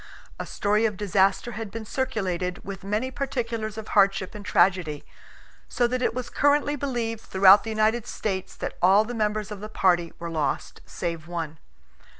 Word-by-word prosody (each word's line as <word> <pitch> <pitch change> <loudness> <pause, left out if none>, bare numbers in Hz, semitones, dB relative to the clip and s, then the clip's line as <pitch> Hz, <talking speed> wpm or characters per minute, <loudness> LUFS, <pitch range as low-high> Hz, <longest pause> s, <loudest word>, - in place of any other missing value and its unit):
A - - -4
story 210 +2 +1
of 210 -3 -5
disaster 200 +3 +2
had 220 -1 -5
been 225 +2 -7
circulated, 190 -9 -2
with 195 0 -7
many 210 +6 -1
particulars 230 -6 -3
of 220 -1 -7
hardship 195 -1 +3
and 210 -2 -8
tragedy, 175 -6 +2 0.6
so 245 - +1
that 250 +1 -1
it 245 - 0
was 250 -1 -3
currently 290 0 +2
believed 240 -5 -3
throughout 195 0 +6
the 225 - -5
United 220 +1 +1
States 190 -3 -3
that - - -6
all 195 +4 +5
the 245 - -5
members 215 -1 -1
of 210 - -6
the 215 +1 -7
party 175 -5 +2
were 170 -1 -6
lost 150 -4 -2
save 170 -2 -4
one. 165 -3 -5
210 Hz, 170 wpm, -25 LUFS, 185-230 Hz, 0.6 s, throughout